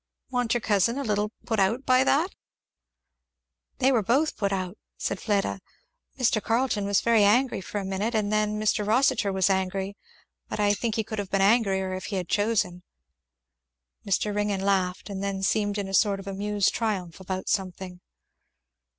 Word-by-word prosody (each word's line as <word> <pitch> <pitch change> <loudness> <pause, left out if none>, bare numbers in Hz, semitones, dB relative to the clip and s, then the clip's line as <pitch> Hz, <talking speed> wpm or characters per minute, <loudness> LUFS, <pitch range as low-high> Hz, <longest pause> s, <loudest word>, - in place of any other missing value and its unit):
"Wa'n't 245 -2 0
your 240 - 0
cousin 215 +3 +2
a 280 - -2
little 210 -2 0
put 225 -3 -1
out 225 +8 +1
by 255 0 +4
that?" 310 +7 +2 1.4
"They 265 0 +3
were 240 -4 +3
both 265 +10 +1
put 200 -1 -1
out," 185 0 -3 0.2
said 195 - -3
Fleda, 200 -2 0 0.6
"Mr. 235 -4 +2
Carleton 225 -2 0
was 200 0 +2
very 230 -2 +4
angry 240 +3 +3
for 190 - -6
a 195 - -5
minute, 200 +5 -2
and 210 -1 0
then 215 0 +1
Mr. 215 0 +1
Rossitur 225 -1 +2
was 190 -1 +2
angry, 190 +1 -1 0.5
but - - -4
I 205 0 +3
think 225 +1 -2
he 220 - 0
could 215 0 -5
have 200 -2 -4
been 195 -1 +1
angrier 195 -3 +2
if 185 +1 -5
he 205 - -4
had 180 -3 -3
chosen." 205 -4 0 1.2
Mr. 205 +2 0
Ringgan 205 -2 0
laughed, 190 -2 0
and 195 -2 -5
then 195 -1 -3
seemed 205 0 +1
in 200 -1 -3
a 195 - -7
sort 200 -1 +3
of 195 - -9
amused 200 +1 0
triumph 195 -7 -2
about 185 0 -5
something. 185 -2 -3
205 Hz, 175 wpm, -26 LUFS, 195-225 Hz, 1.4 s, by